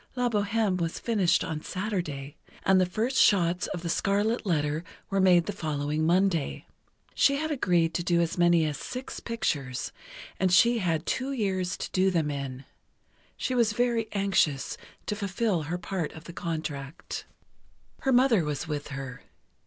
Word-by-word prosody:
"La 250 -1 +1
Bohême" 210 -2 +1
was 165 -1 -2
finished 205 -7 +2
on 155 -1 -4
Saturday, 165 -9 -4 0.3
and 190 -1 +5
the 185 - +2
first 225 +8 -1
shots 180 -3 +4
of 175 -2 -5
"The - - -2
Scarlet 205 +6 +1
Letter" 150 -2 0 0.3
were 195 0 +2
made 180 -2 +5
the 205 - -3
following 155 -3 -1
Monday. 175 -3 +1 0.5
She 280 - +4
had 315 +2 -2
agreed 175 - +2
to 175 - -1
do 170 0 +2
as 170 -1 0
many 175 -2 +4
as 150 -2 -3
six 255 +1 -6
pictures, 140 - -2 0.5
and 185 -1 +2
she 235 +6 +5
had 165 -5 0
two 265 +2 -1
years 190 -7 -1
to - - -5
do 190 +1 +3
them 160 -5 0
in. 135 -2 -5 0.7
She 255 - -2
was 235 -4 +3
very 235 -1 +1
anxious 195 -9 +1 0.3
to 210 - -2
fulfill 200 -2 0
her 175 - -1
part 180 -2 -3
of 160 - -11
the 170 - -10
contract. 155 -4 -5 0.7
Her 270 - 0
mother 245 -7 +5
was 150 +2 -3
with 150 -2 -3
her. 135 -3 -6
180 Hz, 165 wpm, -28 LUFS, 155-210 Hz, 0.7 s, and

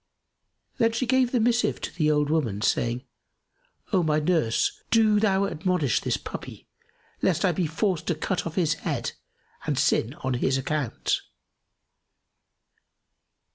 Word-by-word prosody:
Then 230 0 +3
she 255 - 0
gave 255 0 +2
the 250 - +2
missive 235 +1 +2
to - - -5
the 155 -4 +1
old 150 -1 +2
woman, 115 -11 0
saying, 120 +2 0 0.9
"O 185 - +4
my 155 -2 +2
nurse, 150 -8 +1
do 215 -2 +4
thou 200 -2 +2
admonish 155 - 0
this - - 0
puppy - - -8 0.5
lest - - +2
I - - +4
be 180 -3 -1
forced 175 +1 -1
to 175 - +1
cut 170 +3 -2
off 165 - -7
his 165 -5 +2
head - - -3 0.6
and - - 0
sin 120 +6 +1
on 130 0 0
his 130 +2 +1
account." 140 0 -1
160 Hz, 140 wpm, -26 LUFS, 140-200 Hz, 0.9 s, O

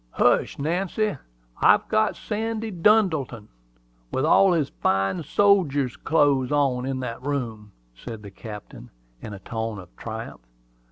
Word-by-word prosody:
"Hush, - - +2
Nancy! 185 +7 -1 0.5
I've - - +5
got 215 -1 +2
Sandy 220 +1 -3
Duddleton, 165 - +2 0.6
with 130 - 0
all 190 +4 +5
his 155 -5 +1
fine 95 - +1
sodjer's 155 -9 +2
clothes 145 -4 +2
on, 135 -3 +1
in 130 -1 -2
that 115 -2 -5
room," 120 -7 -4 0.2
said 105 - -9
the 100 - -9
captain, 105 - -10 0.3
in 110 - -7
a - - -10
tone 110 0 -4
of 90 -2 -12
triumph. 110 - -7
135 Hz, 130 wpm, -24 LUFS, 110-180 Hz, 0.6 s, I've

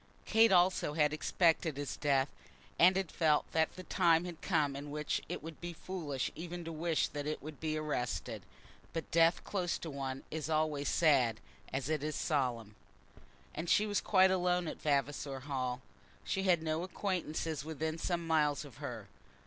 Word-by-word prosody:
Kate 225 -1 +5
also 180 -4 +3
had 150 -1 +2
expected 160 -1 +2
his 145 -1 -3
death, 140 -2 +2 0.5
and 185 +2 +7
had 190 -4 -2
felt 155 -3 +3
that 160 0 +1
the 185 - -8
time 170 -1 +3
had 175 -3 -7
come 145 -2 +1
in 145 +1 -6
which 150 +1 -2
it - - -4
would 160 -1 -9
be 175 0 -5
foolish 160 -6 -4
even 175 +1 -6
to 165 - -4
wish 165 0 0
that 145 0 -5
it 155 - -1
should 155 -1 -8
be 155 -1 -1
arrested. 150 -6 -2 0.5
But 165 - -4
death 165 +1 +4
close 180 -4 -1
to 160 - -6
one 135 -1 -4
is 160 0 -3
always 155 -2 +1
sad 130 -9 +3 0.3
as 135 0 -2
it 155 -2 -1
is 155 0 -2
solemn. 125 -8 -1 0.8
And 165 +3 -4
she 210 - +4
was 205 -1 0
quite 190 -2 +5
alone 180 -1 +1
at - - -6
Vavasor 140 -2 -1
Hall. 130 -2 -3 0.4
She 190 - -1
had 175 -4 +3
no 160 0 -1
acquaintance 170 -5 -2
within 160 +1 -3
some 170 0 -1
miles 150 -2 +2
of 135 -6 -13
her. - - -6
155 Hz, 175 wpm, -33 LUFS, 145-175 Hz, 0.8 s, and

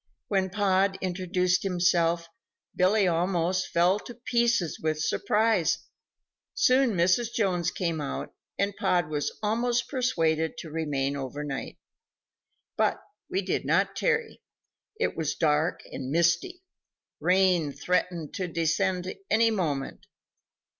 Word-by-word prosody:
When 190 -2 +1
Pod 195 -1 +1
introduced 180 0 0
himself, 175 -2 +1 0.5
Billy 195 +2 +3
almost 180 +1 0
fell 180 +4 +2
to 240 - -10
pieces 235 -7 0
with 155 -1 -1
surprise. 210 +3 +2 0.8
Soon 255 -2 +4
Mrs. 185 +7 +2
Jones 185 -8 0
came 170 -4 -2
out, 140 - -5 0.2
and 200 0 0
Pod 175 -4 +1
was 150 -2 -1
almost 235 +3 +1
persuaded 165 - 0
to 160 - -8
remain 145 -3 -1
over 140 +1 -5
night. 140 -2 -5 1.0
But - - +2 0.3
we 375 +1 -1
did - - -1
not - - +1
tarry. 465 -2 -1 0.6
It 465 - 0
was 155 -2 -2
dark 155 +1 +1
and 130 -1 -5
misty; 170 - +1 0.6
rain 180 -4 +3
threatened 170 +2 -1
to 185 -2 -3
descend 180 +3 0 0.2
any 225 +1 +4
moment. 150 -10 -3
180 Hz, 120 wpm, -27 LUFS, 160-210 Hz, 1.0 s, Soon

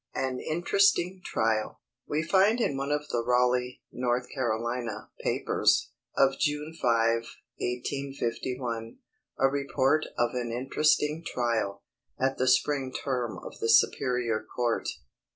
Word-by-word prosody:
AN 130 -1 -1
INTERESTING 185 +2 +2
TRIAL. 110 -1 0 0.3
We 155 +2 0
find 195 +7 +4
in 185 - +1
one 140 +1 -2
of 150 0 -1
the 120 -1 0
Raleigh 125 +1 +1
(North 125 0 -1
Carolina) 120 -3 -2
papers, - - +2 0.3
of 135 0 +3
June 150 +1 -1
5, 115 -6 +2 0.4
1851, 125 -2 -3 0.4
a 135 - +5
report 140 +2 +1
of 120 0 +2
an 120 -2 -2
interesting 150 +5 +1
trial, 115 -8 -1 0.4
at 135 +1 0
the 130 - +2
spring 135 0 +2
term 125 -4 -2
of - - -9
the 115 - -1
Superior 120 -1 +3
Court. 120 -2 0
125 Hz, 120 wpm, -28 LUFS, 120-145 Hz, 0.4 s, a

